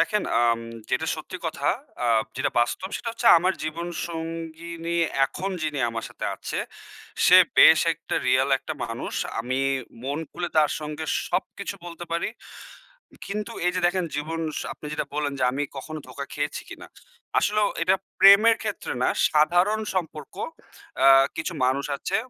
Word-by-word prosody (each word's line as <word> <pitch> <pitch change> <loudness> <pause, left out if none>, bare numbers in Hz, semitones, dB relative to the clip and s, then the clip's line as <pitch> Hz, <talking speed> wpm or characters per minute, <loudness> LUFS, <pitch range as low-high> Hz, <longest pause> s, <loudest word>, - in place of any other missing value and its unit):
দেখেন, 210 -2 +2 0.2
আম 115 -1 +3 0.3
যেটা - - 0
সত্যি - - -7
কথা, - - -3 0.4
আ - - +2 0.3
যেটা - - 0
বাস্তব, 120 +10 -1
সেটা 230 - -5
হচ্ছে 235 - -3
আমার 185 +3 +1
জীবন 165 +2 -4 0.2
সঙ্গিনী, 165 +1 -5 0.3
এখন 190 +8 -4
যিনি 150 -2 -2
আমার 115 0 -4
সাথে - - -8
আছে, - - -5 0.7
সে - - +9 0.2
বেশ - - +9
একটা - - -6
রিয়াল 130 +2 +3
একটা 155 - -6
মানুষ। 115 0 -5 0.3
আমি 130 +3 -2 0.4
মন 140 +3 -2
খুলে 175 0 -4
তার 150 -1 +5
সঙ্গে 150 +1 -5 0.2
সবকিছু 200 +1 -3
বলতে 175 0 -8
পারি। 170 - 0 1.0
কিন্তু 210 +1 -4
এই 180 - +3
যে, 180 - 0
দেখেন, 180 0 0
জীবন, 160 +2 -3 0.3
আপনি 150 - -10
যেটা - - -2
বললেন 145 -1 -1
যে, 130 - +2
আমি 145 +2 -1
কখনো 155 +3 -6
ধোকা 140 +2 -6
খেয়েছি 145 0 -3
কিনা। - - -10 0.5
আসলেও 210 -1 +2
এটা 185 +3 +4 0.2
প্রেমের 210 +4 +8
ক্ষেত্রে 210 -2 -4
না, - - +3 0.2
সাধারণ 175 +8 +3
সম্পর্ক, 155 -5 -4 0.6
অ্যা 135 +1 +6 0.3
কিছু 160 +2 -3
মানুষ 130 +2 +1
আছে। 190 +7 -2
165 Hz, 155 wpm, -25 LUFS, 145-185 Hz, 1.0 s, সে